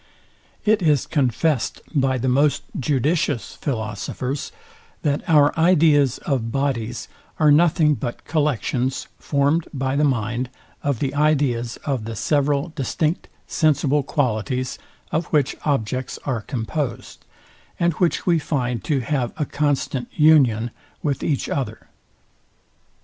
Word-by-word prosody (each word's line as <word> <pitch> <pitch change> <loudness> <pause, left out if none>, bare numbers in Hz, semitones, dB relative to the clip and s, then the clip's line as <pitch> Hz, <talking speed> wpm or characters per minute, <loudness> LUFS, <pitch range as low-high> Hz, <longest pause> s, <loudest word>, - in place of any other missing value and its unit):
It 215 -1 +3
is 150 -6 +3
confest 140 0 0
by 135 -3 +2
the 130 +1 -2
most 140 +3 +2 0.2
judicious 145 0 0
philosophers, 125 +2 -3 0.5
that 145 -2 +1
our 145 -2 +5
ideas 155 -6 +4
of 120 -5 -1
bodies 120 -4 -2 0.3
are 155 -2 +5
nothing 155 0 +4
but 120 -2 -5
collections 135 -4 0
formed 145 +3 +1
by 135 -1 -1
the 145 - +2
mind 120 -2 0 0.3
of 140 -3 0
the 135 +3 -2
ideas 140 -6 +1
of 135 -7 -1
the 115 0 -5
several 145 +5 +1
distinct 155 +4 -1 0.2
sensible 150 -2 +2
qualities, 125 - -1 0.3
of 165 - 0
which 145 -3 +1
objects 130 -3 -1
are 125 -5 -1
composed, 130 +4 -4 0.6
and 170 0 +2
which 170 +2 0
we 170 -3 +3
find 125 - -2
to 140 -4 +1
have 125 -1 -1
a 150 - 0
constant 140 -4 -1
union 130 -8 +4 0.3
with 145 -3 -1
each 145 -4 -1
other. 140 -3 -4
140 Hz, 120 wpm, -22 LUFS, 125-150 Hz, 0.6 s, our